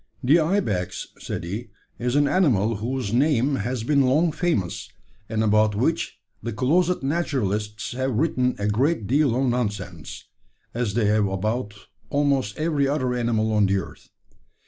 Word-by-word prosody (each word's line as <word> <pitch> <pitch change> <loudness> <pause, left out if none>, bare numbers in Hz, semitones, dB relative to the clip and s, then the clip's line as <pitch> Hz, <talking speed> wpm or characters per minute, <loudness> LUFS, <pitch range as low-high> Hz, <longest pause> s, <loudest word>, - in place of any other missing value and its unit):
"The 145 +7 +5
ibex," 155 - -1
said - - -5
he, 105 +7 -5 0.3
"is 125 +2 -1
an 145 0 +4
animal 115 - +2
whose 120 0 -3
name 135 0 +2
has 120 +2 -3
been 140 +3 +3
long 150 +6 +3
famous, 110 - -1 0.4
and 110 0 0
about 105 0 +3
which 130 +1 -1 0.2
the 115 - -4
closet 165 - +1
naturalists 110 - -1
have 130 0 -2
written 130 -4 +1
a 100 - -1
great 125 +4 +1
deal 135 +1 +2
of 135 +2 +1
nonsense 105 -9 -3 0.5
as 115 -4 -2
they 115 -3 +2
have 105 0 +3
about 105 +3 -2 0.3
almost 140 -6 +1
every 155 -3 +1
other 130 -3 0
animal 115 -3 0
on 105 -2 +3
the 100 0 +2
earth. 95 - -8
120 Hz, 150 wpm, -24 LUFS, 105-140 Hz, 0.5 s, The